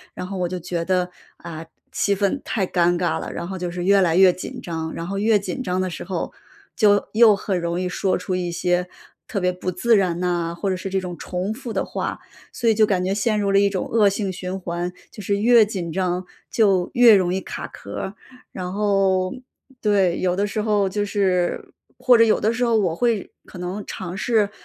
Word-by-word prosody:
然 - - -5
后 190 0 -5
我 175 -1 -1
就 185 - -4
觉 175 0 -3
得， 180 0 0 0.3
啊， 165 -2 -8 0.3
气 200 - +1
氛 200 +8 0
太 200 -5 -1
尴 175 -1 +2
尬 175 -2 0
了， - - -6
然 170 - -5
后 190 0 -5
就 180 0 -3
是 175 0 -4
越 200 +1 +5
来 170 -3 +2
越 185 0 +6
紧 185 - -7
张。 160 -2 -4
然 165 - -5
后 195 +1 -3
越 215 +1 +4
紧 260 +6 -5
张 180 -6 -1
的 185 0 0
时 170 - -6
候 185 -3 -4 0.4
就 205 -3 +3
又 220 -1 +7
很 195 -2 -2
容 170 0 -2
易 180 - -1
说 185 +1 0
出 180 0 -3
一 180 -1 -2
些 180 +1 0 0.4
特 200 - -2
别 180 -1 +1
不 180 0 -4
自 235 +5 +3
然 180 -3 0
啊， 175 -2 -1
或 195 +4 -3
者 190 - 0
是 185 +1 -5
这 190 - +1
种 180 -2 -6
重 185 +3 -3
复 245 0 -7
的 - - 0
话。 - - -4 0.3
所 235 - +1
以 225 - +5
就 215 0 +5
感 190 -3 0
觉 190 +1 0
陷 215 +1 +1
入 200 -1 0
了 195 - +5
一 200 0 +3
种 190 -2 -3
恶 220 -3 +4
性 195 -1 -2
循 185 +1 -5
环， 175 0 -3 0.2
就 210 - -9
是 200 +1 0
越 230 +1 +6
紧 185 -5 -4
张 185 -1 -1 0.3
就 195 -5 +3
越 240 -3 +7
容 180 -2 +2
易 190 - 0
卡 - - -6
壳 - - -11
儿。 190 - -4 0.4
然 180 -1 -5
后， 195 -3 +1 0.5
对， 195 -5 +2
有 180 -1 +1
的 200 +2 +1
时 210 +1 -2
候 210 -2 +2
就 205 +2 -1
是 190 -4 0 0.2
或 250 - +5
者 230 - +7
有 220 - +3
的 220 +2 +1
时 245 +2 -1
候， 230 -1 +3
我 180 -6 +1
会 230 0 0 0.2
可 - - -11
能 180 +3 -4
尝 180 -1 -6
试 210 0 +1
190 Hz, 245 characters per minute, -22 LUFS, 180-205 Hz, 0.5 s, 又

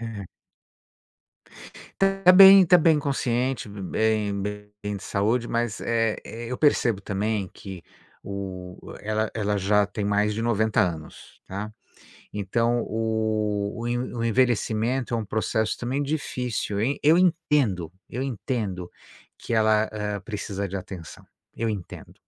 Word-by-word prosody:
Uhum. 115 -4 -6 1.8
Tá 195 -1 +5
bem 195 0 +10
tá 180 - +7
bem 160 -2 +4
consciente, 130 -4 -1
bem 105 0 -1
bem 105 0 -6
bem 105 0 -3
de - - -9
saúde, 115 +4 0
mas, 115 -3 -2
é 115 -2 0
é, 115 +1 -7
eu 125 - -3
percebo 125 -8 +2
também 100 0 -2
que 95 -4 -9 0.4
o 95 -2 -6 0.2
ela 110 +1 -1
ela 105 -2 -1
já 100 +1 +2
tem 100 +1 -4
mais 105 +1 +1
de 115 - -3
90 110 -2 +2
anos, 80 -4 -4
tá? 105 +3 -5 0.6
Então 115 +4 0
o 110 -2 -1
o 120 - -3
en 120 +1 -2
o 115 - -2
envelhecimento 120 +1 +1
é 115 - +2
um 110 - -3
processo 110 +1 -1
também 130 +4 -2
difícil, 125 -8 -2
en 130 +7 +1
Eu 155 +4 +6
entendo, 150 - +1 0.2
eu 125 +3 -3
entendo 105 -8 -3 0.5
que - - -5
ela, 110 -1 +3
hã, 105 -2 -3
precisa 100 -2 -4
de 100 - -3
atenção, 90 -3 -9 0.3
eu 115 - -2
entendo. 100 -5 -7
110 Hz, 140 wpm, -25 LUFS, 100-120 Hz, 1.8 s, bem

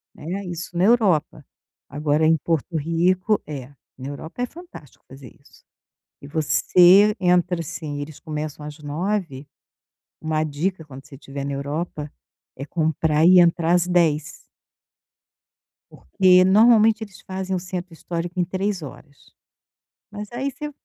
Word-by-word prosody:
Né? 185 +6 -5
Isso 175 0 -7
na 175 - +2
Europa. 195 -10 +2 0.4
Agora, 150 +2 0
em 160 +1 +4
Porto 165 +2 -2
Rico 175 +6 +1
É, 140 -4 -7 0.3
na 130 - -7
Europa 160 +10 -7
é 250 - 0
fantástico 335 - -14
fazer 135 -2 -13
isso. - - -22 0.6
E 140 - -10
você 180 +6 +4
entra, 180 -1 +2
assim 155 -3 -6
eles 145 0 -9
começam 150 -1 -6
às 150 +1 -9
9 150 -1 -3 0.7
uma 155 0 -1
dica, 160 +3 -3
quando 135 -2 -12
você 135 - -15
estiver 140 0 -7
na 140 - -3
Europa, 150 +2 -4 0.5
é 135 - -6
comprar 160 0 0
e 180 0 +8
entrar 170 -1 +3
às 175 0 +2
10. 155 -3 +1 1.5
Porque 185 -2 +3
normalmente 220 +2 +5
eles 200 -3 -10
fazem 190 0 -4
o - - -1
centro 180 -1 -6
histórico 170 +2 -6
em 180 - +2
3 190 +2 -2
horas. 145 -1 -13 0.8
Mas 210 0 -8
aí 265 +4 -3
você 295 +2 -7
170 Hz, 140 wpm, -22 LUFS, 150-185 Hz, 1.5 s, e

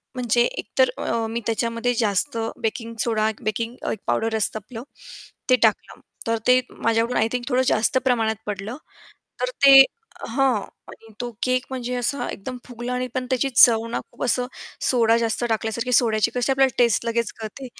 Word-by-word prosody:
म्हणजे 240 -1 +2
एकतर - - 0
अ, 230 -1 -2
मी 230 +1 -3
त्याच्यामध्ये 230 +1 -1
जास्त 215 +6 0 0.2
बेकिंग 230 +1 -3
सोडा 220 -2 +1
एक 220 - -9
बेकिंग 230 +3 -3
अ, - - -2
एक 220 - -4
पावडर 225 0 0
असतं 215 0 +2
आपलं, 225 +2 -9 0.7
ते 255 - +7
टाकलं. 220 -2 0 0.3
तर 230 0 +1
ते 250 0 +5
माझ्याकडून 230 +2 0
आय 220 - +2
थिंक 250 -1 -2
थोडं 255 -1 +2
जास्त 230 +5 +2
प्रमाणात 225 -4 +1
पडलं. 210 +4 -5 0.6
तर - - 0 0.2
ते 275 -1 +10 0.5
हां. 255 -2 +1 0.3
आणि 225 0 -15
तो 245 0 -3
केक 255 0 +1
म्हणजे 250 -1 -4
असा 245 +3 -1
एकदम 250 +6 -7
फुगला 245 0 -6
आणि 250 0 -2
पण 255 -1 -2
त्याची 260 +1 +1
चव 225 -1 +7
ना 230 - -2
खूप - - -11
असं 245 +1 +1 0.4
सोडा 235 -5 +3
जास्त 230 +1 0
टाकल्यासारखी 225 +3 -2
सोड्याची 225 -2 +3
कशी 250 +2 0
आपल्याला 270 -1 +2
टेस्ट 235 -1 +2
लगेच 230 -1 -1
कळते. 225 +4 -8
235 Hz, 175 wpm, -22 LUFS, 225-250 Hz, 0.7 s, ते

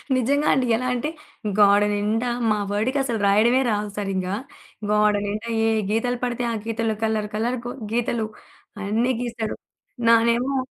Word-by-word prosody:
నిజంగా 280 +4 +1
అండి. 260 -1 +2
ఎలా 255 +3 -2
అంటే 250 +5 -2 0.5
గోడనిండా 205 +3 +3 0.2
మా 210 - +2
వాడికి 220 +7 0
అసలు 235 -4 -2
రాయడమే 230 +6 +4
రాదు 210 -1 -1
సరింగ్గా. 195 -2 -2 0.5
గోడనిండా 210 +1 +1 0.2
ఏ - - +3 0.2
గీతలు 245 +3 0
పడితే, 245 0 -1
ఆ - - -2
గీతల్లో 225 -1 -1
కలర్ 220 -1 0
కలర్‌ 235 +4 0
గొ 245 - -4 0.2
గీతలు 235 -1 0 0.5
అయాన్నీ 220 +5 +1
గీస్తాడు. 230 -3 -3 0.5
నానేమో 235 +4 +3
225 Hz, 135 wpm, -23 LUFS, 210-245 Hz, 0.5 s, రాయడమే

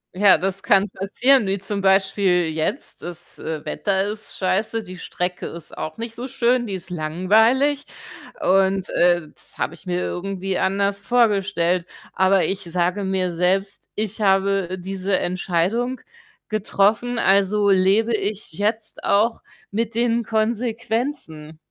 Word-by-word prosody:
Ja, 195 -2 +6
das 195 +3 -1
kann 200 0 +3
passieren, 225 +6 +2
wie 195 +1 0
zum 200 +1 -4
Beispiel 190 -2 +2
jetzt. 155 0 -3
Das, 175 -1 -10
äh, 155 -1 -5
Wetter 195 -2 0
ist 210 +1 -6
scheiße, 215 +4 0
die 185 -2 -10
Strecke 180 +1 -4
ist 170 -2 -9
auch 155 - -5
nicht 230 0 -6
so 245 +2 -5
schön, 245 -2 +1
die 195 - -4
ist 185 -1 -6
langweilig 220 - +2 0.6
und, 190 0 +2
äh, 175 -3 +2
das - - -11
habe 155 - -2
ich 170 - -13
mir 180 0 -1
irgendwie 190 0 -3
anders 200 +1 0
vorgestellt. 195 -7 +2 0.3
Aber 190 0 +3
ich 195 0 -2
sage 180 +3 -1
mir 185 -2 -1
selbst: 190 +3 0
„Ich 215 0 -3
habe 195 -2 +2
diese 190 +1 -1
Entscheidung 185 +8 -1 0.5
getroffen, 215 +3 +1
also 200 0 +3
lebe 195 +4 +3
ich 210 -3 -2
jetzt 215 +5 -3
auch 215 +4 +2 0.3
mit 225 +1 -2
den 235 0 +1
Konsequenzen“ 225 - -2
195 Hz, 140 wpm, -22 LUFS, 185-220 Hz, 0.6 s, Ja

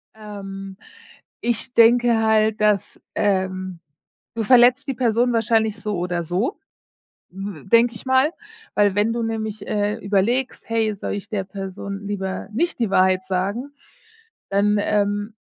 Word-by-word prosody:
Ähm, 195 -2 -8 0.6
ich 240 +2 -2
denke 235 0 +5
halt, 220 0 +2
dass 210 -2 +1 0.2
ähm, 185 -3 -1 0.6
du 225 - -1
verletzt 250 +4 +5
die 270 - -1
Person 240 0 +1
wahrscheinlich 225 -1 +1
so 210 -3 -2
oder 175 -1 -2
so, 185 - -2 0.7
w 195 -3 -7
denke 230 +3 +4
ich - - -8
mal, 260 +3 +3 0.4
weil 205 -1 +3
wenn 210 +2 +2
du 235 0 -2
nämlich, 220 -2 -4
äh, 205 0 0
überlegst: 225 +6 -1
„Hey, 225 -1 +1
soll 200 - -4
ich 205 +1 -6
der 205 -4 -2
Person 195 +1 -7
lieber 190 -2 -4
nicht 340 +8 -1
die 230 -4 +1
Wahrheit 185 -1 +3
sagen?“, 200 +9 -2 0.8
dann, 205 +1 +2
ähm, 205 +1 0
210 Hz, 140 wpm, -22 LUFS, 195-230 Hz, 0.8 s, denke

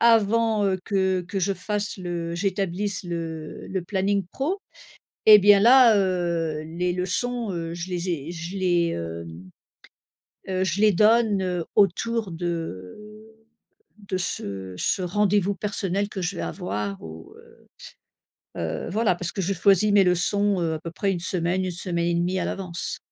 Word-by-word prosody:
avant 225 -1 +3
heu, 190 -1 0
que 190 -3 +1
que 180 +3 -4
je 195 +1 +1
fasse 205 +3 -3
le, 170 -2 -4
j'établisse 195 +1 -2
le 165 -2 -6
le 190 -1 -2
planning 195 +1 0
pro 340 +9 -2 0.7
et 210 -1 +10
bien 200 0 +6
là 240 -1 +7
heu, 170 -5 0
les 170 +3 -2
leçons 220 +5 -2
heu, 165 -1 -4
je 175 +2 -6
les 180 0 -3
ai 165 -1 -3
je 170 +3 -6
les 175 -2 +2
hem, 85 +2 -7 1.0
heu, 185 0 0
je 185 +3 -1
les 215 -1 +5
donne 215 +1 +4
heu, 180 -2 -2
autour 210 +1 +2
de 165 - -4 1.0
de 200 -2 -4
ce 95 - -4
ce 185 - 0
rendez-vous 200 +1 +1
personnel 200 -1 -2
que 195 -3 -5
je 180 +1 -2
vais - - -3
avoir 105 - -4
ou 80 0 -10
heu - - -19 0.9
heu 80 -2 -3
voilà, 215 -2 +2
parce 175 -1 -3
que 195 - -3
je 195 +3 0
choisis 200 +3 +4
mes 200 -2 +6
leçons 195 +2 +1
heu, 165 -2 0
à - - -4
peu 165 - -6
près 195 +1 0
1 175 - -3
semaine, 180 +1 0
1 185 - -2
semaine 170 -1 -2
et 170 - +1
demie 175 +2 0
à - - -1
l'avance. 180 -3 -4
185 Hz, 165 wpm, -24 LUFS, 170-200 Hz, 1.0 s, et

